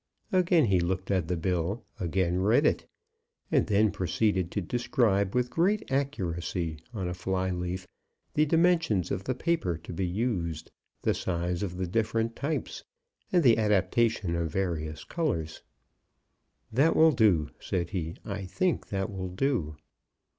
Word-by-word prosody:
Again 180 -4 +4
he 95 -4 +3
looked 95 +2 -1
at 90 -4 +1
the 90 0 -1
bill, 90 +5 -1
again 90 0 0
read 100 +4 +3
it, - - +1 0.6
and - - +3
then 105 0 +3
proceeded 95 -1 0
to 105 - -2
describe 110 -1 +1
with 125 0 +1
great 195 +1 +1
accuracy, 90 - -2
on 100 -6 -3
a 90 - -2
fly 95 +1 -1
leaf, 90 +1 -3 0.5
the 155 +1 +3
dimensions 165 - +2
of 95 - -2
the 130 - -1
paper 130 - 0
to 85 - -9
be 90 +2 -1
used, 90 -6 -2 0.3
the - - +3
size 90 0 -2
of 90 -3 -3
the 95 - -1
different 115 +4 0
types, 150 +3 -3 0.5
and 175 -2 +4
the 115 -4 +5
adaptation 105 -2 +2
of 85 -1 -1
various 80 -4 -2
colours. 105 - -2 1.1
"That 140 +8 +3
will 160 0 +6
do," 100 - +3
said 85 -1 -2
he; 85 -4 -3
"I 100 -2 -4
think 165 - 0
that 100 +2 -2
will 95 -2 -4
do." 90 - -1
95 Hz, 150 wpm, -28 LUFS, 90-120 Hz, 1.1 s, will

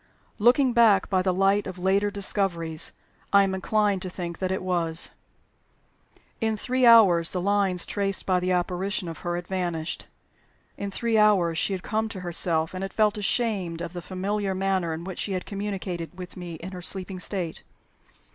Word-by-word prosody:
Looking 245 +3 +4
back 220 -6 +4
by 185 -1 +3
the 185 0 +1
light 195 +2 +2
of 185 -1 -7
later 195 +3 +2
discoveries, 185 -5 0 0.4
I 200 0 +6
am 195 -1 -1
inclined 205 0 +1
to 185 - -3
think 175 -2 -6
that 185 -1 -1
it 190 - -2
was. 170 -3 0 1.3
In 220 -3 0
three 255 +2 +2
hours 190 -8 +6
the 180 - -1
lines 195 -2 +1
traced 195 -1 -1
by 185 -1 +2
the 180 +1 -1
apparition 180 +2 -1
of 165 - -7
her 175 -1 -3
had 175 0 -4
vanished. 175 -4 -3 0.7
In 200 - -4
three 225 +2 +1
hours 185 -6 +3
she 200 - +1
had 185 -1 -4
come 220 0 -1
to 195 -4 -7
herself, 170 -2 -1
and 185 +1 -4
had 195 - -5
felt 215 -1 +2
ashamed 205 -5 -1
of 170 0 -5
the 175 - -5
familiar 195 +2 -2
manner 190 -3 0
in 160 +1 -5
which 185 0 -6
she 200 - -1
had 185 - -3
communicated 190 -4 -5
with 180 -1 -8
me 175 -2 -7
in 175 +4 -8
her 180 -1 -7
sleeping 185 +1 -3
state. 180 -2 -3
190 Hz, 185 wpm, -26 LUFS, 175-205 Hz, 1.3 s, I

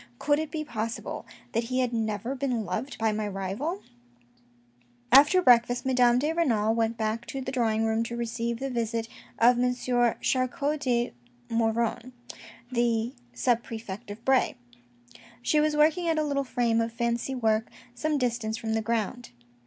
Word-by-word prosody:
" - - -32
Could 290 - +2
it 315 -1 -3
be 310 0 -3
possible 225 -3 -4 0.2
that 230 +1 0
he 255 +2 -2
had 250 -1 -1
never 220 +2 -2
been 255 -5 -1
loved 215 +9 -4
by 225 -1 +1
my 210 0 -2
rival? 205 - -3 0.6
" 120 0 -35 0.3
After 290 +8 +7
breakfast 245 0 +4
Madame 250 -2 +4
de 300 +5 +1
Renal 225 -10 +2
went 230 0 0
back 220 +1 -2
to 270 - -4
the 260 0 -4
drawing 225 -3 +1
room 220 0 +1
to 235 - -5
receive 235 0 -2
the 270 0 -3
visit 230 -1 -2 0.3
of 240 +1 +5
M. 250 0 +2
Charcot 255 +4 0
de 240 -3 0 0.4
Maugiron, 230 +2 0 0.6
the 235 0 +1 0.2
sub 240 -2 +2
prefect 220 -4 -7
of 210 +3 -9
Bray. 265 -1 +3 0.9
She 300 +5 +3
was 300 0 +2
working 315 +3 +3
at 325 -1 +1
a 310 - +2
little 280 -2 0
frame 240 -3 +1
of 230 0 -2
fancy 235 +3 -1
work 220 -2 +1 0.2
some 305 +3 -1
distance 235 -4 -1
from 220 -1 -3
the 220 - +1
ground. 230 +2 -2
235 Hz, 170 wpm, -27 LUFS, 225-260 Hz, 0.9 s, After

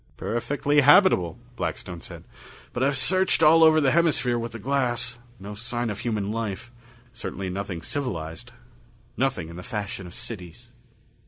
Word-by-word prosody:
"Perfectly 145 +5 +1
habitable," 135 - +5 0.2
Blackstone 85 -2 -4
said. - - -10 0.5
"But 120 - -3
I've 135 +1 +2
searched 185 +6 +3
all 165 +1 +7
over 160 0 +6
the 140 -3 +3
hemisphere 150 -7 +2
with 115 0 -4
the 115 - -7
glass. 120 -1 -1 0.2
No 100 +2 -8
sign 120 +2 -3
of 105 - -6
human 105 -4 -2
life 115 +1 -4 0.4
certainly 95 -5 -5
nothing 95 -3 -5
civilized 115 - -4 0.6
nothing 120 -11 -1
in 85 +1 -10
the - - -6
fashion 100 -3 -5
of 85 - -12
cities." 90 -7 -8
120 Hz, 150 wpm, -25 LUFS, 100-140 Hz, 0.6 s, all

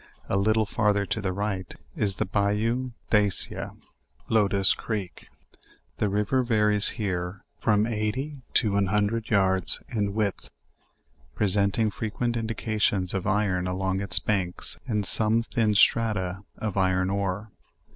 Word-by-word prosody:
A - - -1
little 110 +2 +2
farther 105 -1 +1
to 110 - -2
the 95 -2 -1
right 95 -2 -3 0.2
is 100 -2 0
the - - -1
Bayou 105 +6 0 0.2
de 105 -1 +5
Aea - - -2
cia - - -1 0.6
(Locust 100 -3 +3
creek.) 105 -5 -5 0.7
The 105 - +1
river 105 +6 +1
varies 105 -4 +2
here 90 -2 -3 0.2
from 105 -1 +2
eighty 120 +6 -2
to 105 -4 +3
an 100 -1 +2
hundred 105 +3 0
yards 95 -3 +2
in 100 -3 -1
width, 105 -3 -1 0.9
presenting 100 +2 +1
frequent 120 +3 -2
indications 110 -4 -1
of 95 -2 -2
iron 95 -3 +1
along 95 +1 -1
its 95 -2 +2
banks 95 -4 -1
and 105 -4 0
some 110 +3 +3
thin 110 -2 0
strata 100 -4 +2
of 110 -3 -3
iron^ 95 0 +1
ore. 100 +2 -2
105 Hz, 135 wpm, -26 LUFS, 95-110 Hz, 0.9 s, de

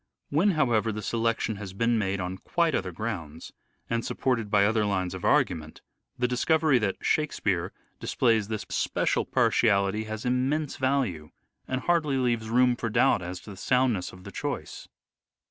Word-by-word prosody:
When, 180 +7 +3
however, 115 -6 +2
the 105 0 -5
selection 115 -1 -1
has 100 -2 -7
been 115 +4 +1
made 100 -1 -1
on 90 +1 -4
quite 170 - 0
other 95 -6 -1
grounds, 85 -6 -5 0.4
and 115 0 -1
supported 115 -6 -1
by 100 -1 +4
other 110 +1 +2
lines 95 -3 -1
of 95 - -7
argument, 80 -3 +1 0.4
the 125 0 +1
discovery 155 +2 +2
that 100 -3 0
" - - -48
Shakespeare 100 - 0
" - - -41
displays 115 -4 +1
this 110 -1 -4
special - - 0
partiality 105 -1 +2
has 110 +1 -6
immense 135 +4 0
value, 130 - 0 0.4
and 130 0 -2
hardly 155 -5 +1
leaves 120 -3 0
room 125 +1 +4
for 115 -1 -3
doubt 105 - +3
as 90 +1 -5
to 105 - -11
the - - -9
soundness 125 -4 +1
of 90 0 -14
the - - -9
choice. - - -5
110 Hz, 170 wpm, -27 LUFS, 95-125 Hz, 0.4 s, by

